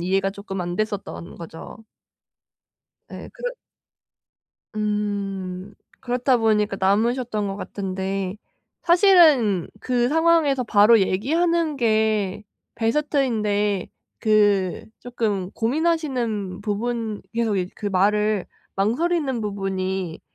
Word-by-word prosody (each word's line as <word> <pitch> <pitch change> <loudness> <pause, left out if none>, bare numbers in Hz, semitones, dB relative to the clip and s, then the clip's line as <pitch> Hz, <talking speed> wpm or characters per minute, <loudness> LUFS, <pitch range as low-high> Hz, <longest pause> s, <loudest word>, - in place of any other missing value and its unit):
이해가 195 +2 +1
쪼끔 195 -2 -6
안 175 0 -4
됐었던 205 -4 -4
거죠. 170 +6 -10 1.2
네. - - -9
그렇 - - -4 1.2
음 200 -2 -3 0.3
그렇다 250 0 +1
보니까 210 -3 +1
남으셨던 215 +2 +1
것 195 0 -4
같은데 195 -1 -4 0.5
사실은 325 - +5
그 245 -1 +1
상황에서 320 -4 +3
바로 215 +1 +5
얘기하는 315 - +1
게 215 -4 +1 0.3
베스트인데 225 - 0 0.3
그 205 -4 +2 0.2
쪼끔 210 -6 -2
고민하시는 240 - -1
부분 220 0 -2
계속 225 -3 0
이제 180 0 -2
그 210 - -5
말을 210 +1 +1 0.3
망설이는 265 - 0
부분이 190 -4 -3
210 Hz, 215 characters per minute, -23 LUFS, 195-245 Hz, 1.2 s, 사실은